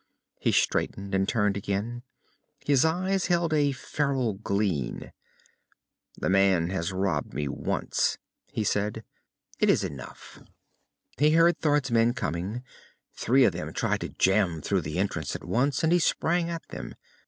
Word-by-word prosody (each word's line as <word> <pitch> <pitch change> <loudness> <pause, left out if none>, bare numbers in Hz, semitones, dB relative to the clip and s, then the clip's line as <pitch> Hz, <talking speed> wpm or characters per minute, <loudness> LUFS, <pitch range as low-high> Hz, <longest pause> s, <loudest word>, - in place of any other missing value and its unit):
He - - +1
straightened 100 0 0
and 95 0 +1
turned 105 -3 +1
again. 100 +4 -3 0.6
His 140 -3 +4
eyes 185 +4 +1
held 170 -2 +1
a 145 -2 +3
feral 135 -3 -1
glint. 100 - -2 1.1
"The - - -2
man 95 -3 +3
has 95 -1 -2
robbed 95 0 -1
me 75 - -1
once," - - -1 0.3
he 110 - -1
said. 105 +2 -1 0.6
"It - - +3
is - - +3
enough." 65 -3 -8 0.8
He 150 +2 +5
heard 165 +1 +4
Thord's 145 -4 +1
men 115 +1 +3
coming. 95 - -3 0.5
Three 130 +3 +3
of 100 - +4
them 90 - -5
tried - - 0
to - - -4
jam 95 -5 +1
through 100 -2 +1
the 75 +2 -5
entrance 85 -6 -2
at - - -6
once, 130 +4 0
and 160 +1 +3
he 175 - +5
sprang 170 +1 +1
at 165 -1 -5
them. - - -7
110 Hz, 150 wpm, -27 LUFS, 95-145 Hz, 1.1 s, He